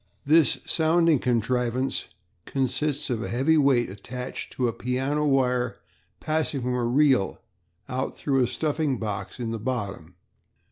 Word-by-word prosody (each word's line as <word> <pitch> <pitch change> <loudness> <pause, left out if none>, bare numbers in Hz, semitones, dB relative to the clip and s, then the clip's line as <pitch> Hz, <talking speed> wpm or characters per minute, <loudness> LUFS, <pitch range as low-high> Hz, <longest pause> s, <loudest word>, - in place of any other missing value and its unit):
This 155 -2 +4
sounding 165 -2 +3
contrivance 125 +2 0 0.4
consists 140 +2 -1
of 115 -2 -1
a - - -3
heavy 135 +7 +2
weight 135 -5 +4
attached 120 +6 -7
to 125 - 0
a 115 - -1
piano 135 +6 -1
wire 125 -3 +1 0.4
passing 155 -3 0
from 125 +1 -1
a 125 -1 0
reel 130 -4 +3 0.5
out 130 +1 -3
through 135 -2 +1
a - - +1
stuffing 150 +1 -1
box 105 +2 -5
in 115 -2 -3
the 115 - -3
bottom. 100 -8 -4
130 Hz, 140 wpm, -26 LUFS, 120-145 Hz, 0.5 s, This